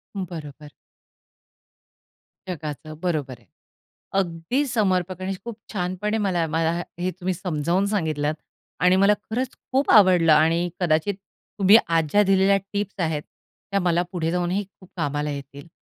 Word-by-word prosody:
बरोबर. 155 -6 -7 1.8
जगाचं 155 -2 -6
बरोबर 155 -7 -1
आहे. 115 - -26 0.7
अगदी 180 - -1
समर्पक 185 -5 0
आणि 190 +1 -2
खूप 235 - -5 0.2
छानपणे 185 +3 -1
मला 175 -4 +1
मला 165 0 +2 0.3
हे 185 +1 -1
तुम्ही 185 0 -1
समजावून 175 +2 0
सांगितलत 155 -5 0 0.5
आणि 180 +2 +4
मला 205 +1 +6 0.2
खरंच 250 +3 -2 0.2
खूप 270 +2 +1
आवडलं 180 -5 +6
आणि 165 +3 +3
कदाचित 175 +3 +1 0.4
तुम्ही 200 +3 +8 0.2
आज 160 -1 +2
ज्या 205 0 +5
दिलेल्या 195 +1 +4 0.2
टिप्स 205 0 -3
आहेत, 160 -3 0 0.5
त्या 200 - +2
मला 170 0 +3
पुढे 165 -3 -1
जाऊनही 180 +3 0 0.2
खूप 185 - -17
कामाला 145 +1 -1
येतील. 140 +2 -8
180 Hz, 135 wpm, -24 LUFS, 160-195 Hz, 1.8 s, तुम्ही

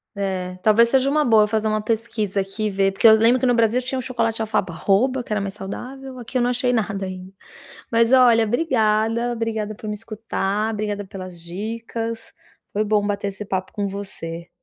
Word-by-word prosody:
É, 190 -2 -3
talvez 220 +3 +5
seja 265 +2 +3
uma 300 +1 +2
boa 225 -5 +5
eu - - +1
fazer 215 0 0
uma 215 0 0
pesquisa 215 -2 -1
aqui 195 +3 -5
e - - +1
ver, 195 0 +1
porque 195 +4 +4
eu 220 - +9
lembro 230 +3 +4
que 260 - 0
no 245 - +4
Brasil 230 +2 +2
tinha 260 +1 -3
um - - -1
chocolate 235 -2 -1
de - - -3
alfarroba 220 +4 +1
que - - -13
era 210 - +1
mais 195 -1 -4
saudável, 255 +7 -8
aqui 245 +2 -4
eu - - +2
não 240 - +2
achei 250 0 +1
nada 200 -4 -1
ainda. 185 0 -8 0.6
Mas, 230 0 +3
olha, 245 -3 +6
obrigada, 225 -2 +1
obrigada 225 -2 -2
por 215 +1 -9
me 210 - -2
escutar, 215 -1 -2
obrigada 205 -1 -3
pelas 185 -2 -9
dicas, 225 +5 -5 0.4
foi 210 - +1
bom 210 -1 +1
bater 200 0 -2
esse 200 +1 -6
papo 190 -1 -3
com 205 -1 -2
você. 180 -4 -6
215 Hz, 205 wpm, -22 LUFS, 200-235 Hz, 0.6 s, eu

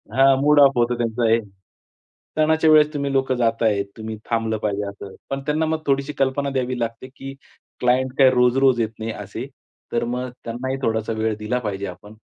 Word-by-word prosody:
हां, 135 +1 +6
mood 150 +1 +5
off 140 -1 +7
होतं 120 0 +2
त्यांचं 120 0 -1
हे. 115 +1 +4 1.0
सणाच्या 160 +1 +3
वेळेस 150 -1 +6
तुम्ही 140 -1 -2
लोकं 135 -1 +1
जाताय, 115 -3 +1 0.2
तुम्ही 110 0 -6
थांबलं 115 -1 0
पाहिजे, 105 -1 -1
असं 100 -1 -10 0.2
पण 135 0 -3
त्यांना 155 +1 +1
मग 160 0 -1
थोडीशी 140 +1 0
कल्पना 135 +1 0
द्यावी 130 -1 -2
लागते, 115 +2 -4
की 135 0 -8 0.5
क्लायंट 125 +1 +2
काय 135 -2 +7
रोज-रोज 125 0 +3
येत 110 - 0
नाही 110 +1 -3
असे, 105 +4 -7 0.5
तर 120 - 0
मग 125 +1 -3 0.2
त्यांनाही 130 +3 -3
थोडासा 110 -2 -1
वेळ 110 0 0
दिला 110 +4 -1
पाहिजे 100 -4 -4
आपण, 100 +4 -11
125 Hz, 180 wpm, -22 LUFS, 110-135 Hz, 1.0 s, off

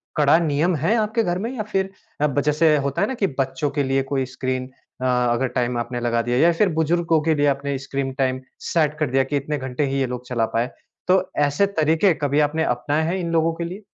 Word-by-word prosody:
कड़ा 150 +1 +5
नियम 165 +2 +1
है 165 - +1
आपके 220 +1 +1
घर 175 -3 -1
में 230 +5 -3
या 220 - -2
फ़िर 195 -2 -1 0.3
अब 145 -2 +2
जैसे 150 +2 +3
होता 140 -1 -1
है - - +2
ना 265 - -3
कि 205 -5 +1
बच्चों 135 +2 0
के 145 0 0
लिए 135 0 +1
कोई 135 -2 +1
स्क्रीन 130 0 -3 0.3
अ, - - -1
अगर 125 0 +1
टाइम 125 -1 -1
आपने 120 +1 -3
लगा 120 -1 0
दिया 120 +1 -1
या 170 +5 +5
फ़िर 195 +4 +2
बुजुर्गों 165 0 +2
के 160 0 +2
लिए 145 0 +2
आपने 140 0 0
स्क्रीन 135 0 -3
टाइम 130 -1 -1 0.3
सेट 155 -2 +2
कर 150 -4 0
दिया 135 +1 +2
कि 145 +1 -1
इतने 150 +2 -2
घंटे 130 +1 -2
ही 135 0 -1
ये 135 - +2
लोग 125 0 -6
चला 120 -3 0
पाए। 115 +2 -1 0.4
तो 185 +1 +5 0.2
ऐसे 145 +7 +2
तरीके 160 +4 +3
कभी 145 -1 0
आपने 150 +2 +1
अपनाए 145 +4 0
हैं 170 +3 -1
इन 170 -2 -3
लोगों 165 0 +2
के 170 - -5
लिए? 185 +5 -7
145 Hz, 235 wpm, -22 LUFS, 130-165 Hz, 0.4 s, कड़ा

